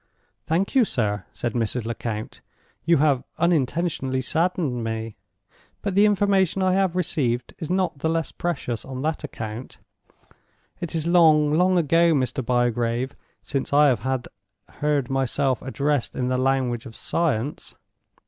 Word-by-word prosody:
"Thank 175 Hz, +5 st, 0 dB
you, 265 Hz, -3 st, +5 dB
sir," 105 Hz, -, -1 dB
said 120 Hz, -2 st, -3 dB
Mrs. 115 Hz, 0 st, -1 dB
Lecount. 115 Hz, -2 st, -5 dB, 0.4 s
"You 170 Hz, 0 st, +4 dB
have 140 Hz, -3 st, +2 dB
unintentionally 155 Hz, -4 st, 0 dB
saddened 155 Hz, -4 st, 0 dB
me; 110 Hz, -1 st, -4 dB, 0.7 s
but 200 Hz, -, -1 dB
the 205 Hz, +2 st, +5 dB
information 195 Hz, -2 st, +2 dB
I 185 Hz, 0 st, +3 dB
have 190 Hz, -2 st, +1 dB
received 125 Hz, -9 st, -1 dB
is 160 Hz, -, -5 dB
not 185 Hz, -5 st, 0 dB
the 160 Hz, -, 0 dB
less 165 Hz, 0 st, -1 dB
precious 145 Hz, -9 st, -3 dB
on 130 Hz, 0 st, -6 dB
that 155 Hz, 0 st, -1 dB
account. 110 Hz, +3 st, -7 dB, 1.0 s
It 170 Hz, -1 st, -5 dB
is 160 Hz, -1 st, 0 dB
long, 155 Hz, -4 st, +5 dB
long 180 Hz, +3 st, +3 dB
ago, 165 Hz, +1 st, +4 dB
Mr. 130 Hz, 0 st, -1 dB
Bygrave, 120 Hz, +1 st, 0 dB, 0.3 s
since 135 Hz, -2 st, -3 dB
I 145 Hz, 0 st, +6 dB
have 130 Hz, +1 st, -1 dB, 0.4 s
heard 145 Hz, -3 st, -1 dB
myself 135 Hz, -1 st, 0 dB
addressed 140 Hz, 0 st, -1 dB
in 125 Hz, -1 st, -1 dB
the 130 Hz, -, +1 dB
language 130 Hz, -2 st, 0 dB
of 115 Hz, -, -11 dB
science. 150 Hz, -5 st, -1 dB
140 Hz, 140 wpm, -24 LUFS, 125-170 Hz, 1.0 s, I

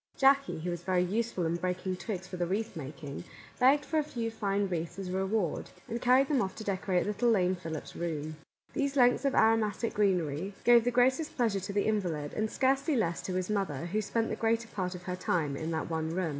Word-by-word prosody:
Jackie, 275 Hz, -, +3 dB
who 175 Hz, +2 st, -2 dB
was 175 Hz, -1 st, -4 dB
very 180 Hz, 0 st, +1 dB
useful 200 Hz, -1 st, -1 dB
in 165 Hz, +1 st, 0 dB
breaking 185 Hz, +1 st, -2 dB
twigs 185 Hz, -1 st, -5 dB
for 185 Hz, -, -7 dB
the 175 Hz, -1 st, -1 dB
wreath 210 Hz, +3 st, -2 dB
making, 145 Hz, -1 st, -7 dB, 0.4 s
begged 275 Hz, +3 st, +5 dB
a 310 Hz, -, +4 dB
few 235 Hz, -6 st, -4 dB
fine 200 Hz, -2 st, 0 dB
wreaths 170 Hz, -2 st, -3 dB
as 195 Hz, -2 st, -5 dB
a -, -, -4 dB
reward, 190 Hz, -2 st, -1 dB, 0.2 s
and 235 Hz, +1 st, -4 dB
carried 255 Hz, +2 st, +5 dB
them 275 Hz, -4 st, +2 dB
off 190 Hz, -3 st, -2 dB
to 220 Hz, -, -7 dB
decorate 190 Hz, -2 st, 0 dB
little 210 Hz, +4 st, +1 dB
lame 185 Hz, -4 st, +3 dB
Philip's 165 Hz, -4 st, -7 dB
room. 155 Hz, -2 st, -3 dB, 0.4 s
These 280 Hz, 0 st, -1 dB
lengths 245 Hz, +1 st, +4 dB
of 275 Hz, -, +2 dB
aromatic 225 Hz, 0 st, +2 dB
greenery 185 Hz, -2 st, 0 dB
gave 240 Hz, -1 st, +6 dB
the -, -, +3 dB
greatest 260 Hz, +6 st, +2 dB
pleasure 225 Hz, -6 st, +1 dB
to 190 Hz, +2 st, -5 dB
the 205 Hz, -, +1 dB
invalid, 175 Hz, -9 st, -1 dB
and 215 Hz, 0 st, -1 dB
scarcely 275 Hz, +5 st, +1 dB
less 175 Hz, -8 st, 0 dB
to 185 Hz, -, -4 dB
his 185 Hz, -1 st, -1 dB
mother, 180 Hz, -8 st, -1 dB
who 205 Hz, +5 st, -1 dB
spent 225 Hz, +2 st, -1 dB
the -, -, -2 dB
greater 230 Hz, +1 st, 0 dB
part 185 Hz, -2 st, -3 dB
of 180 Hz, -, -9 dB
her 180 Hz, 0 st, -3 dB
time 160 Hz, -6 st, -1 dB
in 160 Hz, +3 st, -4 dB
that 160 Hz, -1 st, -2 dB
one 160 Hz, -1 st, -2 dB
room. 175 Hz, 0 st, -1 dB
195 Hz, 220 wpm, -30 LUFS, 175-230 Hz, 0.4 s, gave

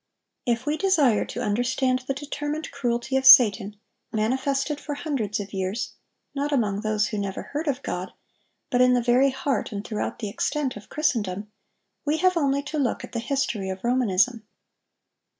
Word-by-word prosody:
If 240 Hz, +1 st, 0 dB
we 300 Hz, +1 st, 0 dB
desire 305 Hz, -, +3 dB
to 245 Hz, -, -5 dB
understand 255 Hz, +4 st, 0 dB
the 275 Hz, -, -1 dB
determined 295 Hz, +2 st, -4 dB
cruelty 250 Hz, -1 st, -1 dB
of 265 Hz, -, 0 dB
Satan, 215 Hz, -5 st, +7 dB, 0.4 s
manifested 270 Hz, +6 st, 0 dB
for 290 Hz, -, -4 dB
hundreds 260 Hz, -, -2 dB
of 205 Hz, 0 st, -7 dB
years, 190 Hz, +3 st, -3 dB, 0.4 s
not 290 Hz, +1 st, -2 dB
among 210 Hz, -7 st, 0 dB
those 215 Hz, -1 st, 0 dB
who 210 Hz, -, -3 dB
never 200 Hz, -1 st, -4 dB
heard 300 Hz, +3 st, -5 dB
of 280 Hz, -1 st, -1 dB
God, 180 Hz, +1 st, -4 dB, 0.6 s
but 250 Hz, -1 st, +3 dB
in 250 Hz, 0 st, +5 dB
the 245 Hz, -, +1 dB
very 250 Hz, +3 st, +4 dB
heart 270 Hz, 0 st, -2 dB
and 205 Hz, -1 st, -5 dB
throughout 215 Hz, -, -3 dB
the 220 Hz, -, -4 dB
extent 275 Hz, +6 st, -2 dB
of 210 Hz, -, -11 dB
Christendom, 210 Hz, -9 st, -1 dB, 0.5 s
we 300 Hz, +1 st, 0 dB
have 370 Hz, +2 st, +3 dB
only 280 Hz, -3 st, +1 dB
to 305 Hz, +1 st, -4 dB
look 260 Hz, -4 st, -1 dB
at -, -, -9 dB
the 235 Hz, -, -3 dB
history 240 Hz, -7 st, -1 dB
of 190 Hz, 0 st, -6 dB
Romanism. 235 Hz, -2 st, +2 dB
250 Hz, 170 wpm, -25 LUFS, 210-280 Hz, 0.6 s, Satan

